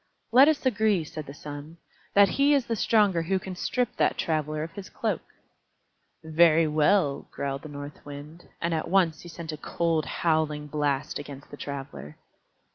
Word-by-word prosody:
"Let 260 +4 +8
us 310 -3 +1
agree," 215 -7 +2
said 155 0 -8
the 140 - -8
Sun, 145 +3 -9 0.4
"that 200 0 +7
he 285 +1 +4
is 270 -4 +1
the 230 - -1
stronger 205 -5 +3
who 190 +4 0
can 185 0 -6
strip 245 +6 -1
that - - +2
Traveler 155 -1 -1
of 165 - -6
his 195 +2 -9
cloak." - - -2 1.0
"Very 160 0 +5
well," 150 0 +2
growled 140 -1 -4
the 155 - -9
North 145 0 -8
Wind, 145 +4 -10
and 170 0 -1
at 160 - -1
once 170 -4 +2
sent 165 -1 -6
a 155 - -6
cold, 165 0 0
howling 155 -3 0
blast 145 -1 -1
against 140 -1 -10
the - - -7
Traveler. 75 - -7
160 Hz, 170 wpm, -27 LUFS, 145-190 Hz, 1.0 s, Let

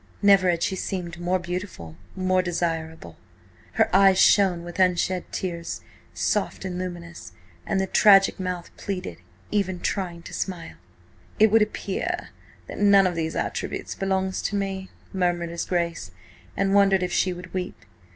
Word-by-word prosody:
Never 195 -2 +6
had 170 -1 +1
she 190 - 0
seemed 175 -3 -4
more 180 +2 +1
beautiful, 175 - -6 0.2
more 185 0 +2
desirable. 165 - -3 0.6
Her - - +3
eyes 195 -1 +6
shone 185 -5 +4
with 175 +2 -8
unshed 180 0 +1
tears, 170 -3 -4 0.3
soft 205 -2 -1
and 180 -1 -4
luminous, 170 - -7 0.3
and 195 - +1
the 190 - +1
tragic 195 0 +5
mouth 180 -2 -4
pleaded, 190 -2 -5 0.3
even 190 -3 0
trying 175 -4 -3
to - - -10
smile. 175 -4 -5 0.6
"It 220 -1 +5
would 225 0 +5
appear 275 - -2 0.4
that - - -8
none 200 -1 +6
of 180 - +1
these 160 -1 -3
attributes - - -3
belongs 190 -1 -1
to 205 - -2
me," 195 -1 -3 0.2
murmured 175 -2 0
his 170 0 -4
Grace, 170 -2 -2 0.5
and 195 0 +1
wondered 195 -2 +4
if 180 - -2
she 185 - +2
would 180 0 -9
weep. 185 -1 -4
185 Hz, 150 wpm, -25 LUFS, 175-195 Hz, 0.6 s, Never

